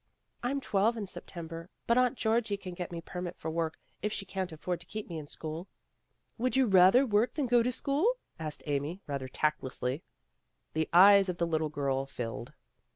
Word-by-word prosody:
'* - - -46
"I'm 270 +3 0
twelve 220 0 +2
in 210 - -3
September, 165 -2 -8 0.2
but 235 - +3
Aunt 250 0 +3
Georgie 220 -2 +1
can 185 -2 -7
get 175 0 -5 0.2
permit 180 -1 -5
for 160 - -4
me - - -6
to - - -7
work, 165 -1 -1 0.2
if 210 +3 -1
she 195 - -2
can't 190 -1 -3
afford 170 +3 -3
to 170 - -13
keep 215 +3 -5
me 165 -3 -5
in 150 - -9
school." 160 +4 -6 0.7
"Would 255 +2 +1
you 265 -1 +5
rather 195 +5 +6
work 220 0 +2
than 295 -3 0
go 240 -1 +4
to 245 +2 +1
school?" 290 - +1 0.2
asked 155 -2 -5
Amy, 150 +6 -2
rather 140 -2 -3
tactlessly. 130 -1 -1 0.7
The 160 0 0
eyes 195 +2 +8
of 180 - -2
the 170 - +1
little 160 -2 0
girl 135 -2 -1
filled. 120 -3 -5
180 Hz, 200 wpm, -31 LUFS, 155-220 Hz, 0.7 s, eyes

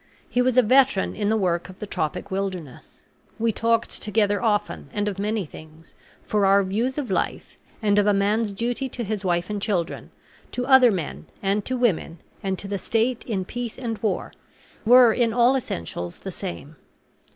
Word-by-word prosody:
He 245 - +1
was 255 0 +1
a 255 - +7
veteran 260 -2 +3
in 205 -1 -1
the 220 - +2
work 175 -3 0
of 185 - -12
the - - -6
tropic 160 -5 -3
wilderness. 185 -8 -5 0.3
We 225 0 +1
talked 230 +1 0
together 205 -1 +1
often, 210 -3 -1
and 205 0 -1
of 195 -2 -3
many 210 -1 -1
things, 155 +1 -14 0.3
for 210 -1 0
our 195 +1 +5
views 225 +8 -1
of 285 -4 -3
life, - - -2 0.2
and 205 -1 +4
of 205 - +2
a - - +5
man's 205 +2 +1
duty 240 +6 -2
to 240 - -5
his 210 -1 -3
wife 175 -1 0
and 210 -1 -4
children, 180 -5 -2 0.4
to 250 - -2
other 265 -2 +7
men, 180 -8 -4 0.2
and 200 +1 +1
to 255 - -2
women, 200 -8 0 0.2
and 190 -2 -2
to 200 - -5
the 200 -1 -3
state 230 +5 0
in 195 -6 -2
peace 240 +2 -5
and 230 -4 -4
war, 210 -4 -2 0.5
were 245 0 +7
in 230 -2 +1
all 245 +2 +4
essentials 85 - -4
the 190 - -7
same. 170 -5 -7
210 Hz, 185 wpm, -24 LUFS, 190-235 Hz, 0.5 s, a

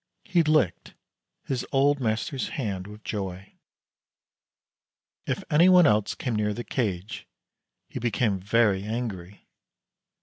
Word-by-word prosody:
He 175 -2 +2
licked 155 - +1 0.5
his 130 -2 -2
old 140 +1 +3
master's 120 +3 -2
hand 100 -8 -3
with 105 +1 -12
joy. 95 -2 -5 1.7
If - - -2
anyone 175 +3 +6
else 105 -4 +2
came 125 -4 -3
near 105 -1 0
the 120 - -5
cage 100 -7 -3 0.6
he - - -6
became 110 -4 0
very 105 0 +2
angry. 105 -4 -5
110 Hz, 110 wpm, -26 LUFS, 100-135 Hz, 1.7 s, anyone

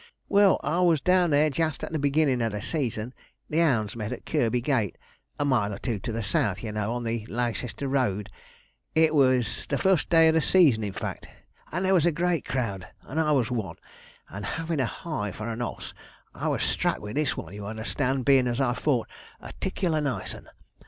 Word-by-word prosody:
Well, 200 -1 +5
I 155 +5 0
was 170 -4 +4
down 180 +2 +3
there 150 +1 +3
just 160 +1 -1
at - - -4
the 160 - -1
beginnin' 140 -3 +2
of 115 -2 0
the 105 - -3
season, 125 -6 -2 0.4
the 160 +2 +3
'ounds 115 -10 +1
met 110 -1 -4
at 125 - -6
Kirby 120 +1 +1
Gate 120 -6 0 0.4
a 145 - 0
mile 120 -7 +2
or 100 - -5
two 115 -1 -3
to 115 - -4
the 115 0 -3
south, 105 - 0
you 110 - -3
know, 105 +1 -2
on 120 0 -3
the 115 -1 -2
Leicester 120 +3 -2
road 120 -7 0 0.6
it 160 -1 +4
was 130 -6 +2
the 140 - +1
fust 190 -2 +2
day 165 -1 +6
of - - +3
the 160 - +3
season, 150 -12 +4
in 100 -2 -3
fact - - -5 0.4
and 180 +3 -1
there 190 - +3
was 175 -3 +4
a - - +4
great 170 0 0
crowd, 105 -8 -3 0.2
and 155 - -4
I 155 -1 +2
was 130 -5 +2
one; 105 -9 -3 0.5
and 105 +1 -7
havin' 165 +5 -3
a 130 - +2
heye 110 - -4
for 105 +4 -6
an 115 +1 -4
oss, 120 - -5 0.4
I - - -4
was - - 0
struck - - 0
with 105 +1 -7
this 150 -2 0
one, - - -7
you 100 0 -7
understand, 125 +4 -2
bein' 135 -2 +5
as 120 +1 -1
I 130 -3 +2
thought, 125 -3 0 0.3
a - - -10
'ticklar 175 -5 0
nice 130 -10 -3
'un. - - -12
130 Hz, 215 wpm, -26 LUFS, 110-155 Hz, 0.6 s, day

